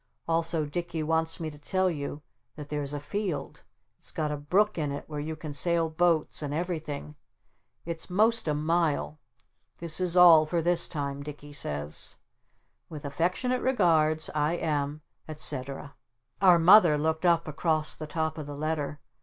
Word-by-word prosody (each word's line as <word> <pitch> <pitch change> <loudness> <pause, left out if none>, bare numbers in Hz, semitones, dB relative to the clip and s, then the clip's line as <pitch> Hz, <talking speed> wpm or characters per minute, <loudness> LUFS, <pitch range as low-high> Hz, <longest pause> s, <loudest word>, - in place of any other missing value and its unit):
Also 165 -1 +1
Dicky 165 +1 -4
wants 160 +1 0
me 160 -2 -4
to 145 - -13
tell 185 +5 0
you 150 -3 -4 0.3
that 150 -2 -9
there's 145 -2 -3
a 145 - -3
field. 185 +3 -4 0.4
It's - - -10
got 150 -1 -2
a - - -1
brook 180 +7 +1
in 150 -2 -1
it 140 - -5
where 150 -2 -5
you 155 +2 -4
can 155 -1 -7
sail 165 +1 +1
boats 165 -1 +1
and 145 -1 -3
everything. 155 -4 -4 0.7
It's 165 +1 -4
most 220 +3 +2
a 150 - +1
mile. 155 -1 0 0.6
This 165 -1 -2
is 180 -1 0
all 165 -3 +8
for 170 +2 0
this 170 +1 +3
time 140 -2 -4
Dicky 145 0 -9
says. 75 - -3 0.7
"With 150 -2 -8
affectionate 185 - -1
regards, 160 -10 +2
I 150 +1 +1
am, 150 -2 -2 0.3
etc. 140 -2 -3 0.2
" 120 - -43
Our 180 -3 +7
Mother 170 -2 +7
looked 160 +2 -1
up 170 -1 +3
across 155 0 0
the 155 - -8
top 160 +1 -2
of 150 - -6
the 145 -1 -7
letter. 150 -1 -3
155 Hz, 165 wpm, -28 LUFS, 150-170 Hz, 0.7 s, all